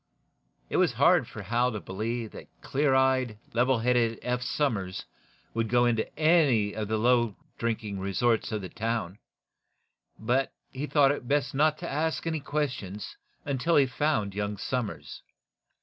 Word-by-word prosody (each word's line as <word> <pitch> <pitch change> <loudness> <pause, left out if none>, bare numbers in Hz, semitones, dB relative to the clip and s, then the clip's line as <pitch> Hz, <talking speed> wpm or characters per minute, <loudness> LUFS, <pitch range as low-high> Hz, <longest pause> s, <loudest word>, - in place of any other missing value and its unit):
It - - +1
was - - +3
hard - - +4
for 110 - -8
Hal 120 +5 +1
to 105 - -3
believe 110 +4 -4
that - - -10
clear 140 -1 +1
eyed, 130 -4 +2 0.2
level 125 +2 +3
headed 115 -1 +2
Eph 125 0 -1
Somers 110 -9 -1 0.5
would 115 -1 -1
go 120 +1 +4
into 115 -2 +1
any 150 -11 +4
of 110 -1 -3
the 110 +1 0
low 120 -2 +3 0.2
drinking 110 -4 -2
resorts 110 +4 +1
of 105 -2 -3
the 95 - -6
town; 110 -4 -3 1.0
but 125 +5 0 0.2
he 140 +3 -4
thought 140 -3 +4
it 145 -4 -4
best 140 0 +1
not 155 +2 +3
to 170 - -6
ask 160 +3 -1
any 160 -1 -1
questions 130 -10 -3 0.3
until 145 +4 +1
he 140 - +6
found 130 -6 0
young 105 +1 -3
Somers. 120 -1 -4
120 Hz, 155 wpm, -28 LUFS, 110-135 Hz, 1.0 s, he